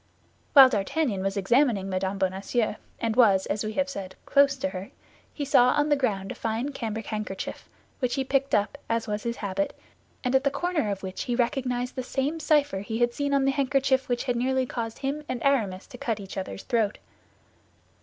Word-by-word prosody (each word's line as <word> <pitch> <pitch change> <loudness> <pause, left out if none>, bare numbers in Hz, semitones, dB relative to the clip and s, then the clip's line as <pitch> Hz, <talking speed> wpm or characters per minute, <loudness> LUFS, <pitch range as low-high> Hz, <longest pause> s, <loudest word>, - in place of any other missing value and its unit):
While 275 -3 +11
D'Artagnan 215 0 0
was 195 +1 -1
examining 220 0 +2
Mme. 190 +1 -2
Bonacieux, 195 +4 -1 0.2
and 225 -1 -1
was, 205 -6 +5
as 205 +2 -2
we 215 0 -3
have 280 +4 +1
said, 195 -8 -6
close 280 0 +4
to 280 +1 -2
her, 190 -3 -7 0.4
he 290 - -4
saw 260 -3 +5
on 295 0 +1
the 290 - +5
ground 205 -8 -1
a - - -3
fine 230 +4 -2
cambric 225 -5 -4
handkerchief, 210 -3 -5 0.3
which 250 -2 0
he 270 - 0
picked 275 +1 +1
up, 210 +7 0
as 230 0 0
was 210 0 -2
his 235 +1 -2
habit, 210 +9 -2 0.5
and 250 0 0
at 265 0 +4
the 280 - +3
corner 300 -4 -1
of 200 -1 -3
which 190 0 -4
he 245 - -1
recognized 250 0 -1
the 260 - -2
same 275 +5 -2
cipher 295 -9 +2
he 220 +3 -4
had 240 0 +2
seen 285 +1 -1
on 275 -1 +3
the 275 - +3
handkerchief 270 -1 +1
which 245 -1 0
had 245 -2 -1
nearly 260 +2 +1
caused 230 -2 -4
him 285 +2 -3
and 250 - -2
Aramis 215 -9 +1
to 250 -4 -12
cut 225 -3 -2
each 195 -1 -8
other's 185 - -5
throat. 220 -3 0
240 Hz, 205 wpm, -26 LUFS, 205-275 Hz, 0.5 s, While